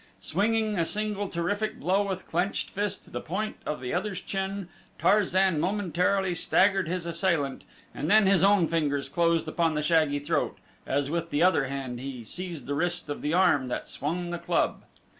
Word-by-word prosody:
Swinging 215 Hz, -, 0 dB
a -, -, +3 dB
single 205 Hz, +2 st, -1 dB
terrific 205 Hz, +6 st, -2 dB
blow 190 Hz, +3 st, +2 dB
with 190 Hz, -2 st, -3 dB
clenched 180 Hz, +4 st, -1 dB
fist 205 Hz, 0 st, -2 dB
to -, -, -17 dB
the -, -, -4 dB
point 210 Hz, +6 st, -3 dB
of 150 Hz, -, -2 dB
the 125 Hz, -1 st, -4 dB
other's 190 Hz, +1 st, -2 dB
chin, 195 Hz, -1 st, -3 dB, 0.3 s
Tarzan 190 Hz, -4 st, +3 dB
momentarily 190 Hz, +1 st, +1 dB
staggered 190 Hz, +1 st, +3 dB
his 180 Hz, 0 st, -2 dB
assailant 170 Hz, -5 st, 0 dB, 0.3 s
and 150 Hz, -, -3 dB
then 215 Hz, +1 st, +6 dB
his 190 Hz, -1 st, +4 dB
own 195 Hz, -4 st, +5 dB
fingers 145 Hz, -4 st, 0 dB
closed 165 Hz, +2 st, +1 dB
upon 165 Hz, 0 st, +1 dB
the 150 Hz, -, -1 dB
shaggy 155 Hz, -2 st, +3 dB
throat, 145 Hz, +1 st, -1 dB, 0.3 s
as 140 Hz, +1 st, 0 dB
with 170 Hz, 0 st, -2 dB
the 150 Hz, +1 st, +1 dB
other 180 Hz, -7 st, +4 dB
hand 130 Hz, -3 st, -4 dB
he 130 Hz, -2 st, -6 dB
seized 170 Hz, -, -5 dB
the 145 Hz, -, -2 dB
wrist 175 Hz, +1 st, -1 dB
of 145 Hz, -, -4 dB
the 150 Hz, +3 st, 0 dB
arm 145 Hz, -8 st, +4 dB
that 125 Hz, -, -4 dB
swung 175 Hz, +4 st, -3 dB
the 175 Hz, -, -3 dB
club. -, -, 0 dB
175 Hz, 180 wpm, -27 LUFS, 150-195 Hz, 0.3 s, then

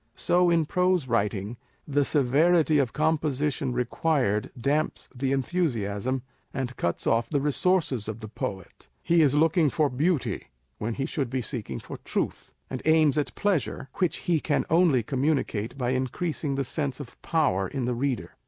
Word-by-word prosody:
So 180 Hz, 0 st, +3 dB
in 165 Hz, -2 st, +3 dB
prose 180 Hz, -2 st, +1 dB
writing, 105 Hz, -1 st, -1 dB, 0.3 s
the 145 Hz, 0 st, +2 dB
severity 150 Hz, +3 st, +3 dB
of 130 Hz, -5 st, +1 dB
composition 150 Hz, -3 st, 0 dB
required 125 Hz, -3 st, 0 dB
damps 145 Hz, +5 st, 0 dB
the 135 Hz, +1 st, -1 dB
enthusiasm, 130 Hz, -, -1 dB, 0.3 s
and 130 Hz, -1 st, -3 dB
cuts 85 Hz, -, -2 dB
off 115 Hz, 0 st, +2 dB
the 145 Hz, -, +1 dB
resources 150 Hz, -, +1 dB
of 110 Hz, 0 st, -5 dB
the 110 Hz, -, -7 dB
poet. 95 Hz, -3 st, -6 dB
He 170 Hz, 0 st, +4 dB
is 145 Hz, -2 st, +4 dB
looking 160 Hz, 0 st, +4 dB
for 150 Hz, -1 st, +1 dB
beauty, 150 Hz, +3 st, 0 dB, 0.3 s
when 110 Hz, +1 st, -2 dB
he 135 Hz, -, -2 dB
should 140 Hz, -4 st, -2 dB
be 130 Hz, 0 st, -2 dB
seeking 105 Hz, -, -5 dB
for -, -, -8 dB
truth; -, -, -3 dB, 0.2 s
and 130 Hz, -, -5 dB
aims 155 Hz, -2 st, +4 dB
at 150 Hz, -2 st, -1 dB
pleasure, 175 Hz, -9 st, -1 dB
which 180 Hz, -3 st, +1 dB
he 170 Hz, -3 st, +2 dB
can 150 Hz, -, 0 dB
only 160 Hz, -8 st, +4 dB
communicato 135 Hz, -4 st, -1 dB
by 125 Hz, -2 st, 0 dB
increasing 140 Hz, +3 st, -2 dB
the 140 Hz, -, 0 dB
sense 140 Hz, 0 st, -3 dB
of 140 Hz, -5 st, -10 dB
power 135 Hz, -, +1 dB
in 135 Hz, -4 st, -3 dB
the 125 Hz, -, 0 dB
reader. 125 Hz, -1 st, -2 dB
140 Hz, 160 wpm, -26 LUFS, 120-155 Hz, 0.3 s, He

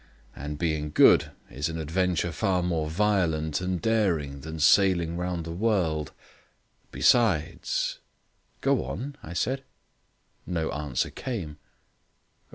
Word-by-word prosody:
And 75 Hz, +2 st, -6 dB
being 80 Hz, -2 st, -1 dB
good -, -, +5 dB, 0.2 s
is 70 Hz, +5 st, -2 dB
an 80 Hz, -, -4 dB
adventure 85 Hz, +2 st, 0 dB
far 90 Hz, +1 st, 0 dB
more 80 Hz, -3 st, -1 dB
violent 80 Hz, -5 st, +1 dB
and 90 Hz, -1 st, -1 dB
daring 85 Hz, -10 st, 0 dB
than 80 Hz, +2 st, -7 dB
sailing 85 Hz, 0 st, +4 dB
round 90 Hz, -1 st, -3 dB
the 85 Hz, -, -5 dB
world. 85 Hz, -6 st, 0 dB, 0.8 s
Besides 100 Hz, -11 st, +1 dB, 0.3 s
" -, -, -41 dB
"Go -, -, +2 dB
on," 115 Hz, -, -5 dB
I 80 Hz, -, -8 dB
said. 130 Hz, +9 st, -1 dB, 0.8 s
No 85 Hz, -3 st, -1 dB
answer 75 Hz, -4 st, -2 dB
came. 85 Hz, -, -5 dB
85 Hz, 120 wpm, -27 LUFS, 75-95 Hz, 0.8 s, good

